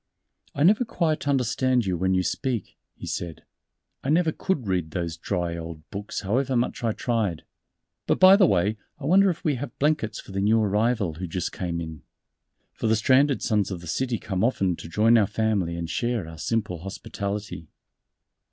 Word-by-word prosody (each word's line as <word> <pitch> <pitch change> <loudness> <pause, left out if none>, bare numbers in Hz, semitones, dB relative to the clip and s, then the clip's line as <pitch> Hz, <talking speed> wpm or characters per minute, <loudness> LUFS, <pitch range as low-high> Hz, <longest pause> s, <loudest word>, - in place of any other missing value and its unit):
"I 140 - +1
never 210 +8 +5
quite 160 -10 -1
understand 130 -2 +1
you 95 -2 0
when 95 +2 +1
you 90 - +2
speak," 125 +1 -2 0.2
he - - -9
said, 85 -2 -5 0.6
"I 135 - -2
never 160 +1 +3
could 155 - -2
read 90 -4 0
those 85 -1 -3
dry 85 0 -2
old 80 -1 -8
books 100 +1 -5
however 130 +7 0
much 120 0 -1
I 115 - +2
tried.... 110 -7 -1 0.6
But - - +2
by 185 +1 +9
the 195 -3 +5
way, 100 +4 +1 0.2
I - - -7
wonder 195 +5 +5
if 170 - -3
we 145 -4 +1
have 145 - -6
blankets 135 -8 0
for - - -11
the 95 0 -2
new 110 +3 +4
arrival 105 -2 +1
who 90 +4 -5
just 90 +1 -3
came 85 -2 -3
in." 80 -3 -7 0.7
For - - -2
the 110 - +4
Stranded 130 +5 +3
Sons 105 -3 +1
of 95 -3 -4
the 85 - -11
City 120 +7 -1
come 95 -1 -2
often 95 -7 +1
to - - -9
join 115 +6 +4
our 105 - +3
Family 100 -7 0
and 85 0 -4
share 120 -1 -1
our 80 -1 -10
simple 105 -4 -1
hospitality. 100 -1 -5
105 Hz, 190 wpm, -25 LUFS, 90-130 Hz, 0.7 s, by